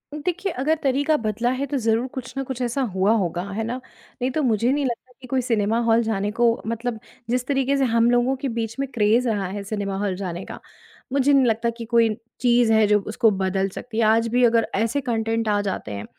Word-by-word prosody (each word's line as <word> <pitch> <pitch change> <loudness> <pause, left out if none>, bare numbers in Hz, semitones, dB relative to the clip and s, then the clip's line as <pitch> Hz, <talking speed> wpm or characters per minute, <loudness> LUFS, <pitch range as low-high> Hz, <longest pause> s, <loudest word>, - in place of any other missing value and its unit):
देखिए, 360 +5 -2
अगर 300 +3 0
तरीका 285 +3 +2
बदला 225 0 -1
है 280 - 0
तो 280 0 -2
ज़रूर 230 0 +1
कुछ 260 -1 -7
ना 270 - -1
कुछ 260 -1 -6
ऐसा 245 +2 -1
हुआ 190 +3 +3
होगा, 175 -3 -1
है 210 +3 -3
ना? 230 +3 -3 0.5
नहीं 255 +1 0
तो 310 - -1
मुझे 235 0 +2
नहीं 285 0 0
लगता 245 0 -4
कि 255 - -10
कोई 260 +1 0
सिनेमा 225 -2 +1
हॉल 230 0 +3
जाने 205 -2 -1
को 235 +1 +3
मतलब 230 0 -3 0.3
जिस 250 +1 0
तरीके 275 0 +1
से 275 - +2
हम 230 -1 +3
लोगों 245 +2 +2
के 270 +1 -4
बीच 225 -1 -3
में 275 - -1
क्रेज़ 230 +2 +3
रहा 205 -4 -1
है 200 +2 -5
सिनेमा 200 -1 -3
हॉल 200 -2 -1
जाने 180 -1 -5
का, - - -9 0.5
मुझे 280 +1 +3
नहीं 270 -2 +5
लगता 230 0 +1
कि 230 - -6
कोई 230 0 +3 0.3
चीज़ 240 -2 +3
है 220 -1 +5
जो 210 0 +4
उसको 220 +1 +3
बदल 190 0 0
सकती 220 +4 -8
है, 230 - +3
आज 225 +1 +3
भी 245 +2 +2
अगर 230 -1 +3
ऐसे 230 +7 0
कॉन्टेन्ट 225 -2 -1
आ 205 -1 +2
जाते 195 - -4
हैं, 100 0 -5
230 Hz, 230 wpm, -23 LUFS, 215-255 Hz, 0.5 s, नहीं